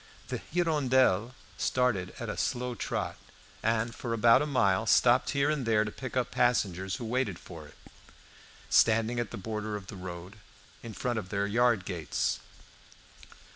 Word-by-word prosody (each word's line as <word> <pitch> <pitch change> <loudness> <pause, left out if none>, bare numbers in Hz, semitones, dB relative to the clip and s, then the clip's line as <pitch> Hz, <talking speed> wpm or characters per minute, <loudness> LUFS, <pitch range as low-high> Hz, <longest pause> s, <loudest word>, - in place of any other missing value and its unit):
The - - -3
"Hirondelle" 130 - +2 0.2
started 120 -8 0
at - - -5
a - - -3
slow 125 0 -2
trot, - - -3 0.4
and 115 +1 0
for 115 0 -4
about 115 +1 +5
a 150 - -1
mile 110 -6 +2
stopped 125 +3 +4
here 140 +1 +2
and 150 -3 -1
there 110 -2 +3
to 105 - -5
pick 130 +2 -6
up 125 - 0
passengers 95 -6 +1
who 120 - -6
waited 115 -5 -1
for 80 -5 -11
it, - - -18 0.9
standing 115 +1 +3
at 120 -3 -2
the 120 - -7
border 105 +1 -4
of 100 -2 -6
the 95 - -9
road, 90 +2 -8 0.4
in 115 -2 -8
front 120 -2 -1
of 95 -3 -8
their 100 0 0
yard 115 -2 +2
gates. 85 -6 -2
115 Hz, 165 wpm, -29 LUFS, 100-125 Hz, 0.9 s, about